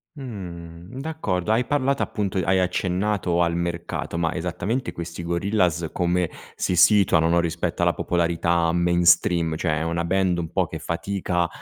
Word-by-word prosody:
Mh. 90 Hz, -, -8 dB
D'accordo 110 Hz, -, -2 dB
hai 115 Hz, +3 st, +2 dB
parlato 140 Hz, -1 st, +1 dB
appunto 100 Hz, -3 st, -3 dB
hai 95 Hz, +1 st, +2 dB
accennato 90 Hz, 0 st, 0 dB
al 85 Hz, -1 st, +1 dB
mercato, 85 Hz, -1 st, -3 dB
ma 85 Hz, -1 st, 0 dB
esattamente 90 Hz, +9 st, -2 dB
questi 85 Hz, 0 st, -7 dB
Gorillaz 85 Hz, -2 st, 0 dB
come 90 Hz, -1 st, +1 dB, 0.3 s
si 90 Hz, -, -1 dB
situano, 90 Hz, -4 st, +5 dB
no, 85 Hz, +1 st, +3 dB
rispetto 85 Hz, +1 st, -2 dB
alla 85 Hz, 0 st, +3 dB
popolarità 85 Hz, -1 st, +1 dB
mainstream? 85 Hz, -1 st, +3 dB
Cioè, 80 Hz, -2 st, 0 dB
è -, -, -2 dB
una 85 Hz, +1 st, -1 dB
band 90 Hz, 0 st, +1 dB
un 85 Hz, -2 st, -4 dB
po' -, -, +1 dB
che -, -, -7 dB
fatica 90 Hz, 0 st, -1 dB
85 Hz, 150 wpm, -23 LUFS, 85-95 Hz, 0.3 s, situano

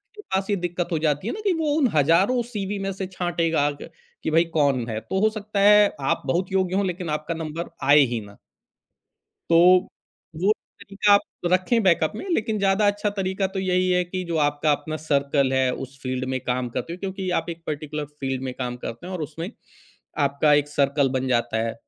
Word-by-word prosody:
के 420 Hz, -, -10 dB
पास 195 Hz, -, -2 dB
ये 205 Hz, -, +2 dB
दिक्कत 175 Hz, -1 st, -2 dB
हो 160 Hz, -, 0 dB
जाती 150 Hz, +4 st, 0 dB
है -, -, -1 dB
ना 425 Hz, -, -6 dB
कि 400 Hz, -3 st, +2 dB
वो 320 Hz, -3 st, 0 dB
उन 280 Hz, -5 st, +4 dB
हज़ारों 170 Hz, -, +3 dB
सीवी 205 Hz, -2 st, -3 dB
में 195 Hz, -, -1 dB
से 190 Hz, 0 st, -5 dB
छाँटेगा 170 Hz, -5 st, 0 dB
क -, -, -9 dB, 0.3 s
कि -, -, -1 dB
भाई 165 Hz, +2 st, +5 dB
कौन 140 Hz, -6 st, +2 dB
है। 110 Hz, -1 st, -3 dB
तो 150 Hz, -, -3 dB
हो 215 Hz, -, +4 dB
सकता 215 Hz, -1 st, -4 dB
है 210 Hz, 0 st, +7 dB, 0.2 s
आप -, -, 0 dB
बहुत 175 Hz, +8 st, -1 dB
योग्य 190 Hz, -1 st, +1 dB
हों 200 Hz, 0 st, +1 dB
लेकिन 180 Hz, -2 st, -3 dB
आपका 155 Hz, +2 st, -2 dB
नंबर 165 Hz, +1 st, -5 dB, 0.2 s
आए 150 Hz, +1 st, +8 dB
ही 120 Hz, -, -1 dB
ना। 100 Hz, -1 st, -13 dB, 1.1 s
तो 165 Hz, -, +4 dB, 0.9 s
वो 200 Hz, +3 st, +4 dB, 0.3 s
तरीक़ा 205 Hz, +1 st, +1 dB
आप 200 Hz, -, +6 dB, 0.3 s
रखें 185 Hz, +6 st, +2 dB
बैकअप 170 Hz, -4 st, +3 dB
में 220 Hz, -, -6 dB
लेक़िन 220 Hz, -9 st, 0 dB
ज़्यादा 200 Hz, +1 st, +3 dB
अच्छा 205 Hz, +1 st, 0 dB
तरीक़ा 195 Hz, -1 st, -2 dB
तो 195 Hz, -, -2 dB
यही 185 Hz, -1 st, +1 dB
है 180 Hz, 0 st, +3 dB
कि 185 Hz, +1 st, -4 dB
जो 170 Hz, -2 st, -2 dB
आपका 145 Hz, 0 st, +2 dB
अपना 150 Hz, +2 st, -2 dB
सर्कल 140 Hz, -2 st, +1 dB
है 130 Hz, -1 st, +2 dB
उस 135 Hz, +1 st, -20 dB
फ़ील्ड 130 Hz, 0 st, -2 dB
में 130 Hz, -, -1 dB
काम 125 Hz, 0 st, -1 dB
करते 165 Hz, -, -3 dB
हो 175 Hz, -, -7 dB
क्योंकि 190 Hz, -1 st, -4 dB
आप 165 Hz, -, -3 dB
एक 165 Hz, 0 st, -7 dB
पर्टिकुलर 150 Hz, 0 st, -4 dB
फ़ील्ड 135 Hz, -1 st, -3 dB
में 130 Hz, -1 st, -4 dB
काम 125 Hz, -1 st, -3 dB
करते 115 Hz, +10 st, -6 dB
हैं 190 Hz, -, -6 dB
और 180 Hz, -, -4 dB
उसमें 160 Hz, +5 st, -5 dB, 0.8 s
आपका 140 Hz, +2 st, +3 dB
एक 145 Hz, 0 st, +3 dB
सर्कल 140 Hz, -1 st, +1 dB
बन 130 Hz, 0 st, -1 dB
जाता 120 Hz, -3 st, 0 dB
है। 115 Hz, -, -2 dB
170 Hz, 215 wpm, -24 LUFS, 145-195 Hz, 1.1 s, आए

